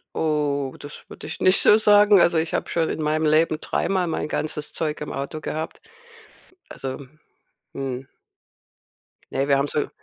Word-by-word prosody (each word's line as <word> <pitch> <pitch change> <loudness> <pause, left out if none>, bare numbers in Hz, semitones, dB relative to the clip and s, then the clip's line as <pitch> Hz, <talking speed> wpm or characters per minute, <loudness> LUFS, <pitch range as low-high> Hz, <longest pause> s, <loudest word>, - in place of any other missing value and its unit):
Oh, 145 -3 -1
das 145 - -10
würde - - -10
ich 160 - -7
nicht 185 +1 +5
so 210 - +6
sagen. 205 -1 +6
Also, 170 -1 +3
ich 160 0 -1
habe - - -2
schon 165 -2 0
in 160 - -3
meinem 155 +1 0
Leben 155 +1 +3
dreimal 185 +1 -1
mein 160 - -2
ganzes 150 -1 -4
Zeug 155 -2 -3
im 150 - -5
Auto 140 +3 -5
gehabt. 155 +1 -5 0.9
Also, 135 +1 -6 0.7
mhm. 135 -1 -5 1.2
Ne, 135 +1 -1
wir 140 -1 +4
haben 140 +1 0
so 150 - -1
155 Hz, 160 wpm, -23 LUFS, 140-165 Hz, 1.2 s, so